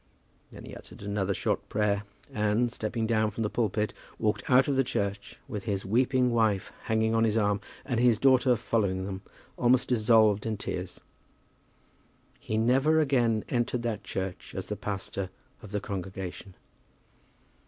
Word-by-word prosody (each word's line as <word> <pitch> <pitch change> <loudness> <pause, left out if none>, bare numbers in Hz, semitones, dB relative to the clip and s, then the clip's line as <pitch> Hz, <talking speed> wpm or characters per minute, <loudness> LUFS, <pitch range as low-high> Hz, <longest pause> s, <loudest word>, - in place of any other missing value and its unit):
Then - - -11
he - - -9
uttered - - -12
another 100 -1 -1
short - - -1
prayer, 105 -1 +1 0.3
and, 105 +3 +1
stepping 110 -1 -2
down 110 -1 +2
from 110 +2 -3
the 105 - -1
pulpit, 110 -2 0 0.2
walked 105 -2 -1
out 130 +1 +6
of 140 - +1
the 135 - +3
church, 100 -5 -3
with 105 -6 -5
his 100 -3 -2
weeping 125 +4 +2
wife 110 -4 +1
hanging 110 0 +1
on 115 0 +3
his 110 -1 +2
arm, 105 -2 +1 0.2
and 125 -4 -1
his 120 -2 +4
daughter 130 0 +4
following 100 -5 0
them, 95 -1 -5 0.4
almost 125 +1 +3
dissolved 110 -3 +4
in 110 -1 -2
tears. 90 -2 -5 1.4
He 110 - -3
never 135 +8 +3
again 120 -7 +2
entered 120 -1 -1
that 115 -4 -2
church 95 -1 -5
as - - -4
the - - -2
pastor 100 -1 -4 0.3
of 105 - -10
the 105 +1 -2
congregation. 95 -1 -6
110 Hz, 155 wpm, -28 LUFS, 100-120 Hz, 1.4 s, out